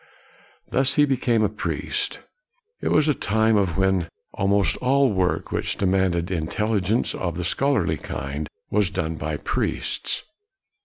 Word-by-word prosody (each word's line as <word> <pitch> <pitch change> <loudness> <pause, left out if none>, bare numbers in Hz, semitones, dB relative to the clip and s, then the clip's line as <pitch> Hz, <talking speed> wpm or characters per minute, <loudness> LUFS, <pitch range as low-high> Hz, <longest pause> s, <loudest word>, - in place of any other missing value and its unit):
Thus 135 +1 +1
he 145 - +5
became 120 -5 +1
a - - +4
priest. 105 +1 -2 0.6
It - - -2
was 150 0 +3
a 150 - +4
time 110 -2 +1
124 105 - +4
KNOX 90 -3 -1 0.2
when 85 -1 -5 0.2
almost 100 -3 +2
all 135 -1 +3
work 95 -2 0
which - - -1
demanded 95 -2 +1
intelligence 100 +5 0
of 85 -2 -3
the 90 - -2
scholarly 140 +8 +1
kind 70 +3 -5 0.2
was 105 -3 +3
done 80 0 -2
by 75 -1 -3
priests. - - -2
100 Hz, 145 wpm, -24 LUFS, 85-115 Hz, 0.6 s, he